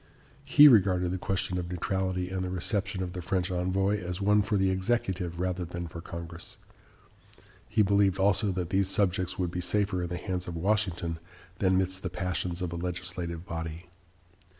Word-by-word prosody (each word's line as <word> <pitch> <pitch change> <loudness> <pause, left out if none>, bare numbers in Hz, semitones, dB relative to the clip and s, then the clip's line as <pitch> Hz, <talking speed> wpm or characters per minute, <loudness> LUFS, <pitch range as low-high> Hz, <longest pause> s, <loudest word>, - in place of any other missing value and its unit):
He 150 0 +9
regarded 95 -7 +4
the 95 - -2
question 95 -1 -1
of 85 -1 -5
neutrality 90 0 -2
and 95 -1 -2
the 90 - -3
reception 95 +1 -1
of 90 -1 -5
the 90 - -5
French 95 0 -1
envoy 95 +3 +1
as 90 +1 -4
one 105 +1 +4
for 105 0 0
the 95 -1 +2
executive 95 -4 -1
rather 90 0 -1
than 85 0 -5
for 85 +1 -8
Congress. 85 0 -8 1.1
He 105 - +3
believed 100 -1 +3
also 100 +1 +3
that 90 -1 -3
these 95 0 +2
subjects 95 -2 0
would 90 -2 -1
be 90 0 -3
safer 100 0 +1
in 85 - -3
the 90 - -3
hands 90 -1 -4
of 85 - -5
Washington 90 -3 0 0.4
than 95 -1 +3
midst 95 0 0
the 90 - -3
passions 90 0 -2
of 85 -2 -3
a - - -4
legislative 90 -1 -4
body. 80 +1 -6
90 Hz, 180 wpm, -29 LUFS, 90-95 Hz, 1.1 s, He